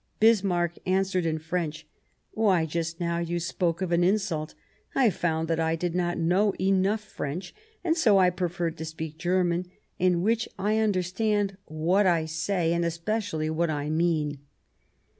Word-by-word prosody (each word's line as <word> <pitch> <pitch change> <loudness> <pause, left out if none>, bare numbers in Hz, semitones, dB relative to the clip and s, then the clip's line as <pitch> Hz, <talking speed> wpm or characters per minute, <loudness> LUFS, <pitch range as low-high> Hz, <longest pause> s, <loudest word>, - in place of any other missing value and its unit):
Bismarck 185 -6 +3
answered 185 -2 +1
in 160 -1 0
French: 160 -1 -3 0.2
" - - -44
Why, 195 -7 +2
just 165 +1 -3
now, 170 -1 -1
you 170 0 -2
spoke 175 0 -1
of 180 - -3
an 170 0 +3
insult. 175 -5 0 0.4
I 250 -5 +4
found 160 -2 -1
that 165 0 0
I 160 0 +1
did 175 +1 -2
not 175 -1 0
know 185 +5 +2
enough 195 +3 +2
French, 180 -3 -6 0.3
and 330 -2 +2
so 230 - +4
I 185 -1 +5
preferred 175 -2 -2
to 160 - -4
speak 160 0 -6
German, 180 0 +1 0.3
in 180 -1 +2
which 225 +2 +1
I 210 +3 +1
understand 205 0 0
what 175 +6 +2
I 165 -3 +2
say, 165 +2 0
and 170 0 +1
especially 170 -1 -2
what 165 +1 0
I 150 0 -2
mean." 155 -3 0
175 Hz, 160 wpm, -27 LUFS, 165-195 Hz, 0.4 s, I